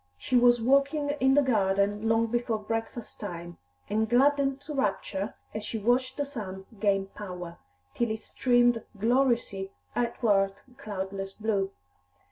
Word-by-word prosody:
She 255 Hz, -, -2 dB
was 240 Hz, -1 st, +5 dB
walking 280 Hz, +3 st, +3 dB
in 265 Hz, +1 st, +4 dB
the 290 Hz, -, +5 dB
garden 205 Hz, -2 st, +1 dB
long 225 Hz, 0 st, +3 dB
before 235 Hz, 0 st, -1 dB
breakfast 225 Hz, +2 st, -5 dB
time, 175 Hz, -4 st, -7 dB, 0.3 s
and 220 Hz, +1 st, 0 dB
gladdened 275 Hz, +2 st, +3 dB
to 300 Hz, +1 st, -7 dB
rapture 205 Hz, -5 st, -1 dB, 0.2 s
as 215 Hz, -, -4 dB
she 225 Hz, -, -3 dB
watched 250 Hz, +4 st, +1 dB
the 285 Hz, -, 0 dB
sun 195 Hz, -9 st, -7 dB
gain 195 Hz, -2 st, +2 dB
power, 180 Hz, -4 st, -8 dB, 0.3 s
till 235 Hz, -1 st, 0 dB
it 220 Hz, 0 st, -4 dB
streamed 245 Hz, -2 st, +3 dB, 0.2 s
gloriously 235 Hz, -4 st, +1 dB, 0.3 s
athwart 205 Hz, -5 st, +2 dB, 0.2 s
cloudless 195 Hz, -5 st, -5 dB
blue. 205 Hz, -3 st, 0 dB
225 Hz, 135 wpm, -28 LUFS, 195-250 Hz, 0.3 s, was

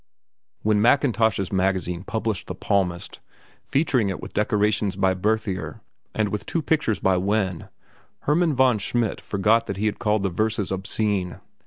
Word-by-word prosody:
When 105 Hz, -1 st, +3 dB
Mackintosh's 115 Hz, -6 st, +2 dB
Magazine 95 Hz, -2 st, 0 dB
published 110 Hz, -3 st, -3 dB
"The -, -, -5 dB
Palmist," 90 Hz, -3 st, -1 dB, 0.4 s
featuring 135 Hz, -7 st, +1 dB
it 95 Hz, -, -4 dB
with -, -, -9 dB
decorations 105 Hz, -1 st, +1 dB
by 95 Hz, -1 st, +2 dB
Berthier 100 Hz, 0 st, -2 dB, 0.3 s
and 110 Hz, -1 st, +1 dB
with 105 Hz, -, -4 dB
two 165 Hz, -, -1 dB
pictures 145 Hz, -, +1 dB
by 95 Hz, -1 st, +2 dB
Wenn, 95 Hz, -2 st, -1 dB, 0.5 s
Hermann 155 Hz, +1 st, +2 dB
von 130 Hz, -4 st, +4 dB
Schmidt 110 Hz, +1 st, -1 dB
forgot 110 Hz, +4 st, +1 dB
that 100 Hz, -, -4 dB
he 105 Hz, -, -1 dB
had 105 Hz, -, -1 dB
called 105 Hz, -3 st, +1 dB
the 95 Hz, -, +1 dB
verses 110 Hz, +1 st, -1 dB
obscene. 95 Hz, -1 st, -1 dB
105 Hz, 150 wpm, -24 LUFS, 95-110 Hz, 0.5 s, von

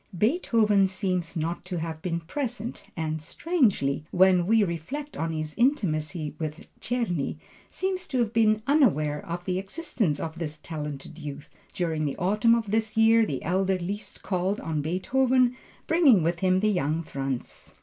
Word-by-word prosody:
Beethoven 215 Hz, -, +3 dB
seems 185 Hz, -3 st, -2 dB
not 165 Hz, +2 st, -2 dB
to 180 Hz, -1 st, -4 dB
have 160 Hz, -1 st, -4 dB
been 170 Hz, -1 st, -2 dB
present, 235 Hz, -, -4 dB
and 155 Hz, -1 st, -2 dB
strangely, 200 Hz, -, +1 dB
when 180 Hz, -1 st, +4 dB
we 220 Hz, 0 st, +5 dB
reflect 200 Hz, -, -4 dB
on 165 Hz, 0 st, -2 dB
his 155 Hz, -1 st, -3 dB
intimacy 160 Hz, -, +1 dB
with 155 Hz, 0 st, -5 dB
Czerny, 215 Hz, -, -1 dB, 0.3 s
seems 375 Hz, -1 st, -2 dB
to 265 Hz, -, -2 dB
have 235 Hz, -2 st, +1 dB
been 215 Hz, -2 st, +3 dB
unaware 165 Hz, -, +2 dB
of 175 Hz, +1 st, -5 dB
the 185 Hz, -1 st, 0 dB
existence 200 Hz, -, -1 dB
of 165 Hz, +1 st, -5 dB
this 155 Hz, -3 st, -4 dB
talented 150 Hz, 0 st, -6 dB
youth. 145 Hz, -1 st, -8 dB, 0.2 s
During 165 Hz, -5 st, -1 dB
the 140 Hz, -, -2 dB
autumn 210 Hz, +5 st, +3 dB
of 220 Hz, -4 st, -2 dB
this 220 Hz, 0 st, 0 dB
year, 225 Hz, 0 st, +5 dB
the 135 Hz, -, -3 dB
elder 190 Hz, +2 st, +1 dB
Liszt 195 Hz, +4 st, -6 dB
called 190 Hz, +2 st, -1 dB
on 155 Hz, -2 st, -2 dB
Beethoven, 250 Hz, -, +2 dB, 0.3 s
bringing 295 Hz, -, +5 dB
with 170 Hz, +1 st, 0 dB
him 185 Hz, 0 st, +2 dB
the 215 Hz, 0 st, +3 dB
young 165 Hz, -3 st, 0 dB
Franz. 135 Hz, -4 st, -5 dB
185 Hz, 160 wpm, -27 LUFS, 160-225 Hz, 0.3 s, we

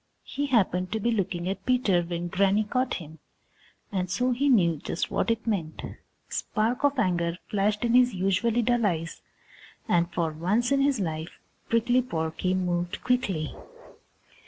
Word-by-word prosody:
He 285 Hz, +1 st, -3 dB
happened 185 Hz, -7 st, +1 dB
to 220 Hz, -, 0 dB
be 235 Hz, +3 st, +1 dB
looking 185 Hz, -5 st, -1 dB
at 195 Hz, -, -3 dB
Peter 245 Hz, -8 st, +2 dB
when 170 Hz, 0 st, -4 dB
Granny 195 Hz, +4 st, +2 dB
caught 255 Hz, +4 st, -1 dB
him, 160 Hz, -2 st, -9 dB, 0.7 s
and 185 Hz, -2 st, -1 dB
so 250 Hz, +7 st, +1 dB
he 275 Hz, +4 st, +1 dB
knew 175 Hz, -, +4 dB
just 165 Hz, -, -3 dB
what -, -, 0 dB
it 230 Hz, 0 st, 0 dB
meant. 180 Hz, -9 st, -2 dB
A -, -, -8 dB, 0.3 s
spark 230 Hz, +5 st, -1 dB
of 285 Hz, -1 st, +3 dB
anger 170 Hz, -6 st, +1 dB
flashed 210 Hz, +2 st, 0 dB
in 235 Hz, -, +1 dB
his 250 Hz, 0 st, +5 dB
usually 195 Hz, +6 st, +1 dB
dull 240 Hz, 0 st, +2 dB
eyes 165 Hz, -5 st, -1 dB, 0.7 s
and 170 Hz, 0 st, +2 dB
for 165 Hz, -1 st, -1 dB
once 195 Hz, -, 0 dB
in 275 Hz, 0 st, +3 dB
his 275 Hz, -3 st, +2 dB
life 160 Hz, -3 st, -4 dB, 0.3 s
Prickly 240 Hz, +2 st, +3 dB
Porky 165 Hz, -4 st, -2 dB
moved 175 Hz, -1 st, -2 dB
quickly. 200 Hz, -, 0 dB
195 Hz, 160 wpm, -27 LUFS, 175-240 Hz, 0.7 s, his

